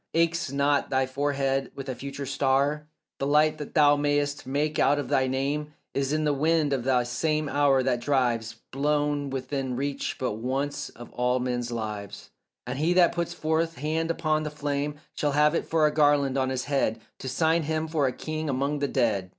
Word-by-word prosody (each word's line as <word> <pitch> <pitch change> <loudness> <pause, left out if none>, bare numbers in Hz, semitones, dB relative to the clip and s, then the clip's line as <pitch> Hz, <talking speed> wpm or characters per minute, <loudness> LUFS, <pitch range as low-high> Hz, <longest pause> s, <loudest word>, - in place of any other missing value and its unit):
Aches 165 -3 +1
not 140 +1 +1
thy 130 0 +2
forehead 135 0 -1
with 135 0 -7
a 130 - -2
future 140 +3 -6
star? 140 +3 +1 0.3
The 135 - -1
light 150 +1 +3
that 150 - -7
thou 145 -2 +6
may'st 145 -1 0
make 150 +3 -1
out 145 - +4
of 145 - -3
thy 130 0 +2
name 145 +3 -2 0.2
Is 140 0 -1
in 155 0 +1
the 150 -1 +2
wind 155 0 +2
of 130 -3 -1
this 125 -2 +2
same 155 +4 0
hour 140 -2 +3
that 125 -2 0
drives, 120 -4 0 0.2
Blown 145 0 0
within 130 -1 -3
reach 140 +2 -3
but 125 -5 -2
once 140 +5 -2
of 120 - -12
all 125 +1 +1
men's 125 -1 -2
lives; 105 -3 -5 0.3
And - - -4
he 165 +4 +2
that 180 -1 +5
puts 170 -1 -2
forth 160 +1 0
hand 160 +3 -1
upon 155 -2 +1
the 155 - -3
flame 145 0 -2 0.2
Shall 145 -1 -1
have 150 +1 +4
it - - -1
for 160 -1 +3
a 150 - +2
garland 145 -3 +3
on 130 -1 +1
his 130 -1 -2
head 135 -6 0 0.2
To 130 - -5
sign 160 +5 +2
him 160 +1 -1
for 155 -4 +1
a - - 0
king 155 +3 -4
among 140 +2 0
the 140 - 0
dead. 110 -9 0
145 Hz, 200 wpm, -27 LUFS, 130-150 Hz, 0.3 s, thou